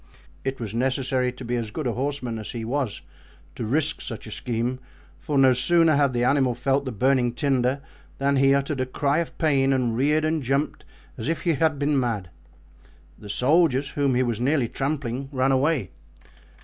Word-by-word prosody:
It 135 0 -3
was 110 -3 -5
necessary 130 +1 0
to 125 0 -9
be 120 +1 -1
as 115 -2 -3
good 150 +7 -5
a 120 - +1
horseman 125 -2 -3
as 110 - -7
he 115 -2 -4
was 130 -3 -2 0.5
to - - -5
risk 150 +5 0
such 115 -3 -7
a 110 - -9
scheme, 120 +3 -2 0.4
for 150 -3 -2
no 135 -1 +6
sooner 165 +4 +4
had 140 -2 +3
the 120 0 0
animal 130 -1 +2
felt 135 +2 0
the 130 - -3
burning 125 +1 +2
tinder 135 0 0 0.4
than 140 0 +1
he 135 0 +4
uttered 140 0 -1
a 130 - -1
cry 140 +3 0
of 170 - -4
pain 140 -4 +2
and 125 -4 +1
reared 150 +5 +2
and 160 0 0
jumped 135 +3 -1 0.3
as 115 - -2
if 165 -2 -2
he 170 - +2
had 155 0 +1
been 145 0 +1
mad. 105 -8 -2 0.9
The 105 - -11
soldiers, 140 - +2
whom 140 -2 0
he 130 - +3
was 120 -3 -2
nearly 135 -1 +2
trampling, 135 -1 -3
ran 130 0 +1
away. 135 - +1
135 Hz, 190 wpm, -24 LUFS, 125-145 Hz, 0.9 s, no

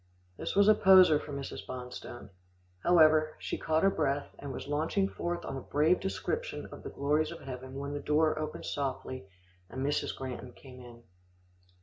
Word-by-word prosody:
This - - -4
was 200 +1 +5
a 215 - +9
poser 185 -6 +7
for 150 - -9
Mrs. 140 -1 -5
Bonstone. 125 -3 -8 0.5
However, 155 - +5
she - - -4
caught 160 +2 +1
her 195 - +5
breath, 145 -4 -1
and 140 - -6
was - - -6
launching 160 +7 0
forth 175 -2 -4
on - - -4
a - - -5
brave 155 +7 +2
description 465 - -3
of - - -9
the - - -7
glories 150 +2 0
of 170 - -9
heaven 130 0 -8
when 140 +1 -4
the 145 - -3
door 155 +2 +2
opened 155 - -5
softly, 130 -5 -4 0.4
and 130 +1 -4
Mrs. 145 - -1
Granton 125 -2 -6
came 130 -2 -13
in. 120 -1 -13
145 Hz, 180 wpm, -31 LUFS, 130-160 Hz, 0.5 s, a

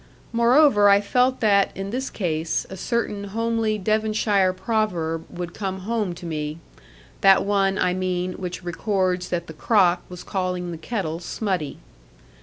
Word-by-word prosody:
Moreover, 235 -3 +5
I 200 0 +6
felt 250 +5 +1
that, 200 -3 +4
in 195 +1 -4
this 260 +3 -2
case, 160 -4 -2
a - - -5
certain 205 0 -2
homely 225 +1 -1
Devonshire 215 -2 +1
proverb 185 -5 -1
would 175 -1 -6
come 190 -2 -4
home 210 -3 -2
to 175 - -10
me; 155 -1 -3 0.6
that 195 0 +6
one, 195 -1 +2
I 180 - +2
mean, 185 0 -2
which 180 0 -6
records 180 0 -1
that 170 -1 -2
the 160 - -9
crock 180 0 +3
was 180 -1 -9
calling 180 -2 -2
the 165 - -6
kettle 165 -4 -3
smutty. 180 -6 -3
190 Hz, 150 wpm, -23 LUFS, 180-215 Hz, 0.6 s, I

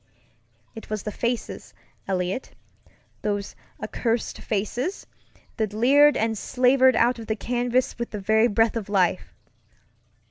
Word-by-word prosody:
It 225 - -11
was 215 -2 -3
the 210 - -4
faces, 235 +2 -4 0.3
Eliot, 185 +5 -2 0.7
those 205 -1 -3 0.3
accursed 230 -1 -2
faces, 235 - -3 0.5
that 215 -3 -1
leered 280 +7 +5
and 225 0 0
slavered 255 +3 +3
out 240 +1 +2
of 225 - -8
the 220 - 0
canvas 245 +2 -1
with 235 - -3
the 210 - -5
very 220 +3 +3
breath 225 0 +2
of 215 -3 -4
life! 185 -3 0
225 Hz, 130 wpm, -24 LUFS, 210-245 Hz, 0.7 s, leered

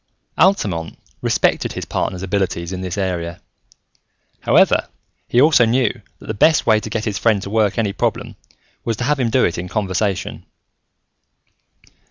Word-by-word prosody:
Altamont 100 - +1 0.2
respected - - +1
his - - -5
partner's 90 0 -3
abilities 95 -2 -2
in 95 - -5
this 90 0 -4
area. 85 -3 -3 1.0
However, - - +3 0.4
he 120 - +2
also 145 -2 +6
knew 120 0 +1 0.2
that - - -15
the 110 - -3
best 155 +9 +3
way 110 -1 +4
to 110 - -7
get 110 0 -3
his 105 -3 -2
friend 110 -3 +2
to 100 - -7
work 110 -2 +1
any 105 -4 0
problem - - -2 0.5
was 115 -2 -2
to 125 - -3
have 145 +2 +1
him 120 -3 +1
do 125 +3 +3
it 85 - -2
in 90 - -5
conversation. 95 -1 -2
105 Hz, 160 wpm, -19 LUFS, 95-115 Hz, 1.0 s, also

